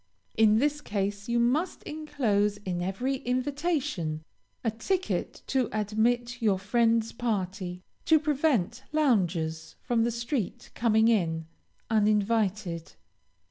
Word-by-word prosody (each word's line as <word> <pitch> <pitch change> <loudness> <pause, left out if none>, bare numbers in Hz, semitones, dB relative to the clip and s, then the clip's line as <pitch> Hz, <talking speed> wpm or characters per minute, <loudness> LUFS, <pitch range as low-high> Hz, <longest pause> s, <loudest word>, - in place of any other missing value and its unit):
In 215 -1 +5
this 295 +4 +1
case 200 -2 -3
you 235 0 +2
must 285 +10 +1
enclose 240 -10 0
in 185 -4 -3
every 245 +9 -1
invitation 255 - -1 0.4
a 225 - +1
ticket 370 - -2
to 260 -3 0
admit 235 +4 0
your 205 -4 +3
friend's 230 +3 +2
party, 190 -5 -3 0.2
to 320 - +6
prevent 280 - +1
loungers 180 - +1
from 235 -2 +1
the 235 - +2
street 235 - -3
coming 220 -1 +3
in, 165 -8 +1 0.5
uninvited. 210 -5 +1
225 Hz, 110 wpm, -28 LUFS, 200-255 Hz, 0.5 s, to